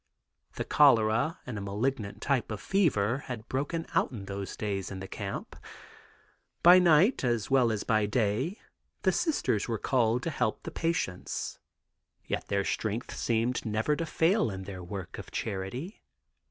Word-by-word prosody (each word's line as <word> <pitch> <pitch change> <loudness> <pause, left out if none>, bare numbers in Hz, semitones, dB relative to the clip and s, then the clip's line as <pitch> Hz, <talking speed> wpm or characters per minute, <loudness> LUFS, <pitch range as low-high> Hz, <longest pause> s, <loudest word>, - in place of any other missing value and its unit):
The - - -2
cholera 120 +2 +4
and 120 -5 -5
a - - -5
malignant 105 +2 -2
type 140 -4 +1
of 105 - -4
fever 130 - +2
had 120 -3 -6
broken 145 +5 -2
out - - +2
in 105 -6 -7
those 100 0 -5
days 100 -3 -2
in 95 - -6
the 95 - -6
camp. - - -5 1.1
By 180 +2 +9
night 175 - +4
as 120 -2 0
well 125 -4 +4
as 105 -2 -2
by 110 -2 +2
day 120 - 0 0.4
the - - +4
Sisters 315 - 0
were 115 -2 -1
called 120 +1 +1
to 165 - -1
help 125 -6 -1
the - - -6
patients, 165 - -2 0.7
yet - - -3
their 100 -1 0
strength 110 +3 -2
seemed 115 +2 0
never 110 +6 0
to 165 +2 -3
fail 165 - +2
in 95 -2 -5
their 95 -1 -7
work 95 0 -6
of - - -9
charity. 110 - -4
115 Hz, 160 wpm, -29 LUFS, 100-145 Hz, 1.1 s, By